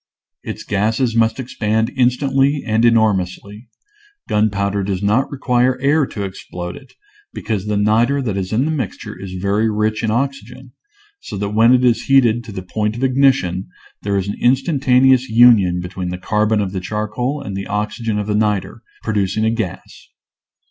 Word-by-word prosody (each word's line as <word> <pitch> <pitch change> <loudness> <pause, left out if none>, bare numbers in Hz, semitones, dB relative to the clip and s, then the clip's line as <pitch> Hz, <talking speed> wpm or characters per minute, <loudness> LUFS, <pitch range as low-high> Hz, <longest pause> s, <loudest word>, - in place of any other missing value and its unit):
Its - - -7
gases 110 +4 0
must 115 +1 +2
expand 110 -2 -1
in 130 -1 +2
stantly 135 +2 0
and 110 +1 +2
enormously. 105 -1 0 0.6
Gunpowder 100 -1 0
does 95 0 -3
not 110 +7 +1
require 125 -2 0
air 140 +1 +2
to 100 - -5
explode 90 -2 -7
it, 135 - -15 0.4
because 105 -2 -3
the 105 -1 0
niter 115 +7 +2
that 115 -7 -2
is 95 -1 -3
in 120 +5 +1
the 160 - -1
mixture 150 -5 -5
is 95 -1 -8
very 100 +4 0
rich 105 0 -1
in 110 - 0
oxygen, 130 +1 -3 0.5
so - - -8
that 100 +1 -2
when 115 +3 +4
it 125 0 +4
is 120 -2 +2
heated 120 -4 +3
to 110 - -9
the 95 -2 -6
point 105 +3 -2
of 120 - -5
ignition 130 -9 +2 0.3
there 100 -1 -1
is 95 0 -2
an 100 - -4
instantaneous 130 -1 +3
union 110 -6 +5
between 90 0 -5
the 90 - -4
carbon 105 +3 0
of 95 -2 -3
the 95 - -3
charcoal 110 +8 -3
and 100 -8 -6
the 100 0 -5
oxygen 105 +1 -2
of 105 - -2
the 105 - -2
niter, 105 -2 -1 0.2
producing 105 0 0
a 110 - +2
gas. 110 -6 -6
110 Hz, 175 wpm, -18 LUFS, 100-125 Hz, 0.6 s, union